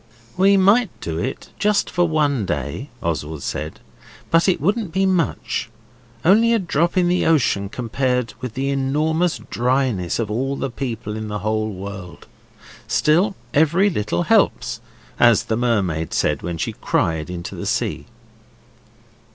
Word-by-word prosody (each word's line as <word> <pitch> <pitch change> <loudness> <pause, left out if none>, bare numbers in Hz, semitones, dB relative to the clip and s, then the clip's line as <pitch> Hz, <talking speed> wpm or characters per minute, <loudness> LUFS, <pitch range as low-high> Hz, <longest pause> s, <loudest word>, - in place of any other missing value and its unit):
'We 195 +2 +5
might 200 +4 +4
do 80 -1 -4
it, 130 +8 -4
just 210 0 +2
for 175 0 +1
one 145 -6 +1
day,' 75 - -3
Oswald 80 -3 -3
said, 75 +1 -4 0.5
'but 165 +3 +4
it 185 - +1
wouldn't 200 - 0
be 190 +3 +1
much 180 - 0 0.6
only 225 +6 +5
a - - +4
drop 170 -2 0
in 180 -1 +4
the 180 +1 +2
ocean 125 -11 +2
compared 125 0 -1
with 125 -3 -5
the 135 +1 -1
enormous 155 +5 +1
dryness 125 -7 0
of 110 -3 -2
all 135 +5 -1
the 135 - -3
people 115 -4 -4
in 110 0 -5
the 105 0 -3
whole 110 0 0
world. 95 -2 -8 0.6
Still, 180 +6 +2 0.2
every 170 +7 +3
little 105 - -1
helps, - - +2 0.4
as 120 -3 +5
the 110 - -1
mermaid 100 -10 0
said 75 -2 +1
when 85 0 -4
she - - -2
cried 80 0 -1
into 85 -1 -6
the - - -5
sea. - - -1
130 Hz, 150 wpm, -21 LUFS, 100-170 Hz, 0.6 s, We